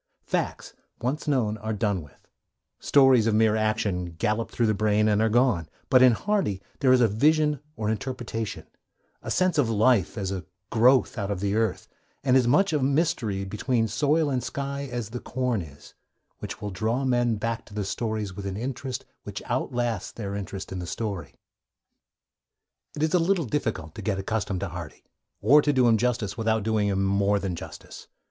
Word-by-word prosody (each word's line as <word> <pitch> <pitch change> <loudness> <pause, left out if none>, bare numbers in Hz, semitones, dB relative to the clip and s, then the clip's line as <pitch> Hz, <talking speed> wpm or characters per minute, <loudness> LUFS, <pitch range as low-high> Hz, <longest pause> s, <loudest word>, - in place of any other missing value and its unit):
Facts, - - -2 0.3
once 135 +6 -2
known, 120 -7 +1
are 110 +1 -3
done 100 -3 0
with; 70 -5 -17 0.5
stories 135 -5 +5
of 110 - +2
mere 110 0 +4
action 105 -5 -1
gallop 105 +6 0
through 120 - 0
the 110 - +2
brain 105 +1 +2
and 105 0 +3
are 110 - +3
gone; 110 -9 +2 0.2
but 130 - +7
in 130 -2 +7
Hardy 195 - 0 0.2
there 130 -3 +4
is 130 -1 +5
a 120 - +6
vision 150 +6 +2 0.2
or 110 - -3
interpretation, 115 -1 -3 0.6
a - - -7
sense 185 -4 +2
of 125 -6 +2
life 110 -2 +2
as 95 -2 -2
a 95 -2 -4 0.3
growth 125 +1 +4
out 100 -1 -2
of 100 -3 -2
the 100 +1 -1
earth, 110 0 0 0.4
and 130 -2 +3
as 130 -2 +4
much 175 +8 +3
a 150 - +2
mystery 130 - 0
between 115 +4 0
soil 150 +8 +1
and 125 -2 -1
sky 140 +1 -4
as 120 -3 -4
the 125 - -4
corn 125 -5 -1
is, 75 -3 -13 0.5
which - - -7
will 105 - -3
draw 110 +7 -1
men 120 -2 +2
back 115 +2 -3
to 105 - -15
the 105 -2 -2
stories 110 -1 -3
with 100 0 -5
an 95 0 -4
interest 130 +2 -4 0.2
which - - -7
outlasts 120 -5 -2
their 100 -3 -5
interest 100 -1 -6
in 95 - -4
the 90 - -5
story. 100 -7 -4 1.6
It 150 - -2
is 155 - +1
a 180 - +5
little 170 -1 +1
difficult 110 - -2
to 110 - -8
get 100 -1 -1
accustomed 95 -1 -2
to 100 - -2
Hardy, 85 -3 -8 0.4
or 140 +8 +6
to 145 - +2
do 130 -3 +3
him 115 -1 +5
justice 115 -3 -1
without 110 -1 +1
doing 110 -1 +1
him 95 -1 +1
more 100 +1 +2
than 95 -3 -3
justice. - - -10
110 Hz, 190 wpm, -26 LUFS, 100-130 Hz, 1.6 s, but